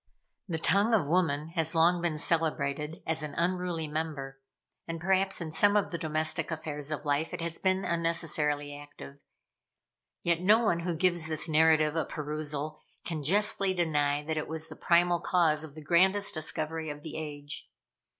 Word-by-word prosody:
The 170 -4 -2
tongue 200 +7 +3
of 195 - +1
woman 155 -2 +1
has 165 0 0
long 170 +2 +4
been 170 -3 -1
celebrated 150 -2 -1
as 160 -1 -1
an 150 -1 -6
unruly 175 -1 -1
member, 145 -3 -5 0.5
and 165 0 -4
perhaps, 190 +3 +1
in 165 -3 -5
some 205 +6 +3
of 200 - 0
the 170 - -2
domestic 155 0 0
affairs 150 -3 -4
of 155 -1 -4
life, 145 +2 0
it - - -7
has 165 0 -2
been 190 0 +1
unnecessarily 155 -4 0
active; 145 -1 -12 1.0
yet 170 0 +1
no 215 +5 +4
one 170 -5 +2
who 170 0 -2
gives 175 -1 +2
this 155 +1 -1
narrative 155 -1 +4
a 160 - +1
perusal, 150 0 -3 0.2
can 160 -3 -3
justly 195 +3 +3
deny 150 -4 +1
that 160 0 -2
it 155 - -2
was 160 0 -4
the - - -9
primal 175 0 +3
cause 160 -4 +2
of 155 -2 -10
the 155 - -10
grandest 190 +6 +3
discovery 160 0 -3
of 145 0 -7
the 160 - -7
age. 145 -2 -6
160 Hz, 170 wpm, -29 LUFS, 150-175 Hz, 1.0 s, long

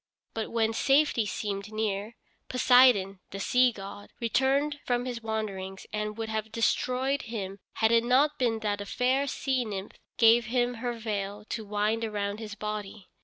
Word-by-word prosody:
But 220 -1 -3
when 225 -1 +1
safety 270 -2 +3
seemed 200 0 -4
near, 215 0 -2 0.3
Poseidon, 245 -7 +5
the 195 - -7
sea 250 +5 +4
god, 200 -1 -9
returned 270 +5 +1
from 245 0 0
his 245 -2 -4
wanderings 200 -4 -4
and 210 0 -3
would 225 -1 -3
have 220 0 -3
destroyed 255 +4 +1
him 200 -3 -5
had 220 0 +2
it 230 0 +5
not 280 +5 +3
been 230 -3 +1
that 205 -1 -1
a 205 - -6
fair 260 +5 +1
sea 260 -1 0
nymph 200 -3 -6 0.2
gave 235 +1 +6
him 245 +1 +1
her 245 -1 -1
veil 210 -2 -4
to 225 - -3
wind 210 +2 0
around 205 -1 -2
his 215 -2 -7
body. 210 -2 -6
220 Hz, 165 wpm, -28 LUFS, 205-245 Hz, 0.3 s, gave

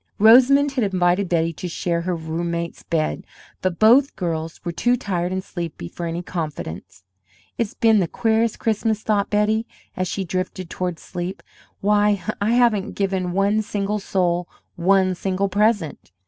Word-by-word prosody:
Rosamond 260 +6 +6
had 260 -3 0
invited 185 -1 +1
Betty 165 -1 +1
to 180 - -6
share 170 0 -1
her 180 +1 -2
roommate's 170 +1 -4
bed, 155 -2 -1 0.4
but 185 -2 -1
both 250 - +5
girls 165 -2 -3
were 175 - -1
too 245 +8 +1
tired 180 -6 -2
and 190 0 -2
sleepy 170 - -6
for 170 - -6
any 170 +1 -4
confidence. 145 - -6 0.6
"It's 230 -3 -1
been 225 -2 +4
the 180 - +1
queerest 225 +3 +1
Christmas!" 220 -1 0
thought 205 -2 +1
Betty, 215 +2 +1 0.3
as 185 0 -1
she 190 +1 -3
drifted 185 0 -4
toward 180 -2 -3
sleep. 175 +3 -6 0.4
"Why, 205 -1 +2 0.2
I 215 +3 +2
haven't 235 -5 +2
given 190 -2 -1
one 200 +3 +2
single 210 -1 -2
soul 180 -3 0 0.3
one 185 +1 +3
single 190 +2 -1
present!" 205 - 0
190 Hz, 155 wpm, -22 LUFS, 175-210 Hz, 0.6 s, Rosamond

